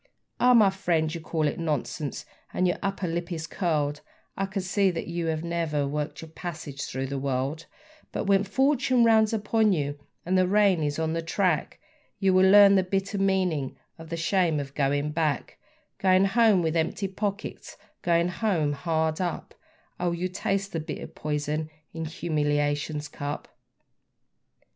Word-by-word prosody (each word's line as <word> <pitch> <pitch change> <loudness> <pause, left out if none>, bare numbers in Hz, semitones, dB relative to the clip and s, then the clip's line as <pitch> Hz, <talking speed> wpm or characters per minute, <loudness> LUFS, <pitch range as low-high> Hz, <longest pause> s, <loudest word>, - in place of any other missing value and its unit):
Ah! 250 0 +6
my 210 -4 +6
friend, 165 -5 0
you 170 - -5
call 155 -1 -1
it 145 - -3
nonsense, 150 -2 -3 0.3
and 185 - +2
your 175 - -1
upper 195 -2 -2
lip 170 +1 -3
is 160 -2 -3
curled, 150 -5 -1 0.3
I 195 - -1
can 190 0 -3
see 195 +1 +2
that 170 -2 -3
you 170 -1 -3
have 160 0 -1
never 165 -4 -1
worked 150 +2 -4
your 160 - -11
passage 155 -5 -6
through 130 +1 -3
the 135 +1 -3
world; 140 +4 -2 0.4
But - - -2
when 195 -1 +3
fortune 260 +3 +2
rounds 220 -2 +5
upon 220 -1 +2
you 145 -3 -2 0.3
and 185 +2 +1
the 185 -1 +4
rain 200 -3 +3
is 145 -1 -1
on 160 0 -1
the 165 - -1
track, 165 -1 0 0.4
You 195 -2 +2
will 185 +1 +5
learn 200 0 +8
the 195 - +5
bitter 195 +2 -2
meaning 185 -8 0 0.2
of 165 -1 -10
the 165 - -3
shame 165 -2 +1
of 140 -1 -6
going 145 +1 0
back; 155 -3 -1 0.4
Going 185 0 +4
home 210 -2 +4
with 160 0 0
empty 165 +4 0
pockets, 200 +2 -5 0.2
Going 170 0 +2
home 175 -6 0
hard 160 +3 -1
up; 175 -2 -3 0.5
Oh, 175 -1 0
you'll 180 +2 -3
taste 195 +1 -1
the 165 - -1
bitter 155 - -6
poison 150 +1 -3 0.2
in 165 0 -4
humiliation's 150 -2 -1
cup. 145 0 -5
170 Hz, 165 wpm, -26 LUFS, 150-195 Hz, 0.5 s, learn